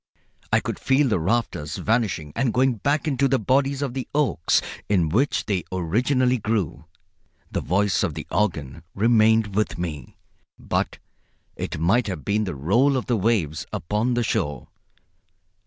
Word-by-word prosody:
I - - +4
could - - -4
feel 135 +2 +3
the 105 - +1
rafters 85 -5 -1
vanishing 105 -10 -1
and 130 -3 +1
going 130 -1 +3
back 145 +7 0
into 140 -1 +2
the 135 0 +2
bodies 135 +4 +1
of 135 -4 -3
the 130 -1 -4
oaks 140 - +2 0.3
in 90 -6 +2
which 125 - +1
they 95 -4 -1
originally 125 - +1
grew. 100 -8 -2 0.7
The - - -1
voice 100 +1 +1
of - - -1
the - - -6
organ 80 -8 -1
remained 110 -1 +3
with 105 +2 0
me, 80 -4 -6 0.4
but - - -2 0.6
it - - -4
might 110 +9 +2
have 85 -9 -5
been 105 +1 +1
the 90 - -4
roll 120 - +2
of 125 - -3
the 120 - +1
waves 95 -8 0
upon 110 +8 -1
the 120 - +1
shore. 75 - -2
110 Hz, 155 wpm, -24 LUFS, 90-125 Hz, 0.7 s, I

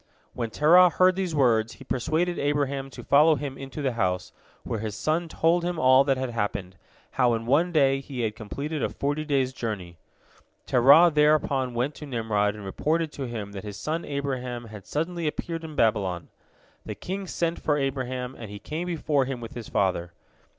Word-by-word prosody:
When 115 -2 -3
Terah 175 +9 +6
heard 185 +1 +3
these 185 -4 -2
words, 115 -5 +2
he - - -13
persuaded 160 +8 -1
Abraham 140 -1 -1
to - - -10
follow 150 +3 +5
him 145 -2 -5
into 135 +2 -7
the 135 - +1
house, 95 -6 -1 0.3
where 115 - -3
his 105 -1 -4
son 160 +9 0
told 165 +2 +1
him 175 -1 -2
all 130 0 +6
that 135 -2 +2
had 130 -1 -3
happened—how 105 +3 -2
in 115 0 -4
one 155 +8 +2
day 135 -4 +3
he 135 -2 -6
had 110 -2 -1
completed 140 +8 -5
a - - 0
forty 145 +2 -2
days' 135 -4 0
journey. 100 -9 -5 0.7
Terah 140 +8 +6
thereupon 150 -4 +2
went 125 +5 0
to 150 - -9
Nimrod 110 -5 0
and 105 -2 -9
reported 155 +10 -1
to 135 -3 -5
him 110 -4 -5
that 100 -1 -7
his 105 -1 -7
son 155 +9 -3
Abraham 130 -4 -4
had 105 -2 -11
suddenly 165 +2 -2
appeared 165 +2 -4
in 155 -2 -8
Babylon. 95 - 0 0.5
The - - -6
king 190 +1 -5
sent 170 -1 -1
for 150 -1 +1
Abraham, 130 -2 -2
and 110 -5 -9
he 105 - -7
came 155 - -5
before 155 -5 0
him 130 -1 -4
with 115 -1 -8
his 120 -3 -8
father. 90 -3 0
135 Hz, 185 wpm, -26 LUFS, 115-155 Hz, 0.7 s, Terah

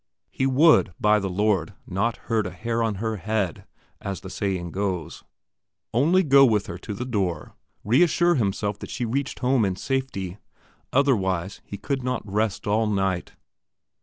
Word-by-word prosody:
He 130 - 0
would, 135 - +4
by 105 0 +4
the 100 -1 -3
Lord, 95 -3 0
not 110 +5 -1
hurt 110 -4 0
a - - -4
hair 115 +6 -2
on 110 -2 0
her 110 +2 -2
head, 100 -3 -2 0.4
as 100 -1 -4
the 95 - -9
saying 95 -4 -2
goes 95 -4 -3 0.7
only 165 +10 +4
go 140 -3 +6
with 110 -6 +3
her - - -7
to 105 - -6
her 125 - -4
door, 95 -10 -2 0.3
reassure 175 - +4
himself 105 - -1
that - - -8
she 120 - -3
reached 135 +4 -2
home 125 -2 +3
in 95 -2 0
safety, 105 -6 -3 0.5
otherwise 95 -9 +1
he 100 - -7
could 135 +6 -2
not 125 -3 -2
rest 105 +1 -1
all 110 +2 +2
night. 95 -3 -1
105 Hz, 165 wpm, -24 LUFS, 95-125 Hz, 0.7 s, go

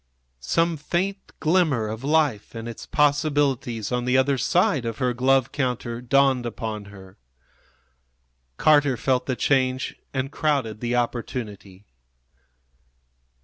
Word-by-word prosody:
Some 165 - +1
faint 185 +6 -2 0.2
glimmer 155 -9 +2
of 110 +3 -6
life 145 -8 +1
and 115 0 -6
its 115 - -8
possibilities 145 -6 +1
on 125 0 -1
the 125 +1 +3
other 135 +1 +3
side 170 - +2
of 115 -1 -4
her 125 -2 0
glove 130 +1 +2
counter 125 -3 -2
dawned 130 0 +3
upon 110 -3 -5
her. 95 -2 -14 1.4
Carter 145 -4 +4
felt 130 0 0
the 130 - 0
change 130 -1 0 0.2
and 135 +1 -3
crowded 140 -10 -1
the 120 +1 -1
opportunity. 110 -5 -4
130 Hz, 120 wpm, -24 LUFS, 115-145 Hz, 1.4 s, Carter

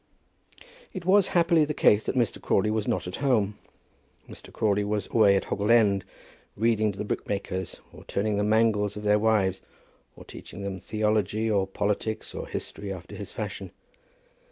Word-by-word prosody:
It 185 -3 -6
was 195 +1 +5
happily 170 -2 +4
the 150 0 -2
case 105 +1 +4
that - - -2
Mr. 120 -4 0
Crawley 105 +2 +1
was 110 -1 -1
not 90 - -1
at 90 - -5
home. 110 -7 +1 0.7
Mr. - - -12
Crawley 105 -1 +1
was 105 -1 -2
away 105 -3 +5
at 100 - +1
Hoggle 105 +2 -2
End, 105 -5 +4 0.5
reading 110 -1 +2
to 100 - -12
the 105 - -3
brickmakers, 95 -3 -4
or - - -13
turning 105 +1 -1
the 105 - +1
mangles 105 -1 +2
of 105 - -6
their 105 0 +3
wives, 105 -4 +1 0.5
or - - -13
teaching 100 +3 -10
them 95 -1 -4
theology, 110 +2 0
or 100 -2 +1
politics, 105 +2 -2
or - - -6
history, 100 -1 -6
after 95 -1 -8
his - - -8
fashion. - - -5
105 Hz, 170 wpm, -26 LUFS, 100-110 Hz, 0.7 s, was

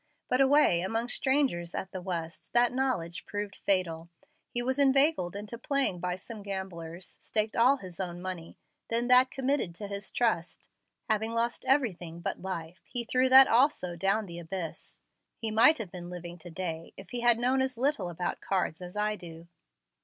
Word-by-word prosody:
But 255 +1 +3
away 270 - +5
among 225 +6 -2
strangers 260 -12 0
at 190 - -4
the 185 - -5
West 165 -3 -5
that 240 0 +4
knowledge 250 -11 -1
proved 205 -1 -4
fatal. 170 -4 0 0.4
He 240 - -1
was 260 +2 -1
inveigled 275 - +3
into 210 +3 -6
playing 275 -11 +1
by 180 0 -2
some 210 +3 -9
gamblers, 185 -3 -6
staked 215 0 -1
all 255 +4 +5
his 185 -6 -10
own 175 -2 -4
money, 180 -2 -6 0.3
then 235 +2 0
that 250 +1 +7
committed 265 -10 -1
to 205 +3 -6
his 200 -1 -5
trust. 220 -8 -1 0.4
Having 220 0 0
lost 235 +1 0
everything 185 - 0
but 170 - -4
life, 175 -2 -5
he 245 -2 -2
threw 255 +3 +2
that 265 +1 +9
also 230 - +2
down 195 +5 +1
the 170 -2 -8
abyss. 170 0 -6 0.4
He 225 -1 -2
might 230 +9 +6
have 210 -6 -6
been 175 -1 -8
living 175 0 -8
to 175 - -11
day 165 -2 -5
if 190 - -12
he 245 - -3
had 240 -1 +6
known 255 +3 +2
as 260 -2 -1
little 250 -8 0
about 175 +1 -3
cards 185 -3 -1
as 180 +1 -8
I 210 0 +1
do." 170 -3 -11
200 Hz, 180 wpm, -29 LUFS, 175-245 Hz, 0.4 s, that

